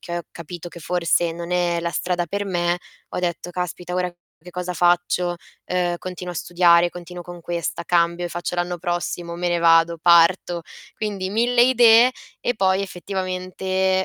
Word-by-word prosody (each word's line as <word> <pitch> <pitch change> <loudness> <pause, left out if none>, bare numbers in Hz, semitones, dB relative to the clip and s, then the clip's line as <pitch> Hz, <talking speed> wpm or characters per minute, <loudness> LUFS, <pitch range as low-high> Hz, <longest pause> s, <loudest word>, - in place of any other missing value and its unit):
che 175 0 -5
ho - - -6
capito 175 +1 -8
che 170 - -12
forse 170 0 +1
non 170 +1 -7
è 175 -1 +1
la 170 0 -2
strada 175 0 -1
per 200 +4 -3
me, 175 -2 0 0.3
ho - - -4
detto: 175 0 -3
"Caspita 180 0 -4
ora 180 -1 -1 0.3
che 180 - -11
cosa 180 0 -4
faccio? 175 0 +1 0.3
Uhm, 175 -1 0
continuo 180 -1 -6
a - - -8
studiare, 175 0 +4
continuo 175 0 -9
con 175 0 -10
questa, 170 0 -3
cambio 170 0 +1
e - - -2
faccio 175 +1 -4
l'anno 175 0 -1
prossimo, 175 -1 -3
me 175 +1 -2
ne 175 0 +1
vado, 165 0 +4
parto?" 170 0 +4 0.3
Quindi 200 -3 -3
1000 240 +3 +3
idee, 240 -1 +6 0.3
e 245 - 0
poi 190 -1 +2
effettivamente, 185 0 -2
175 Hz, 170 wpm, -22 LUFS, 170-185 Hz, 0.3 s, idee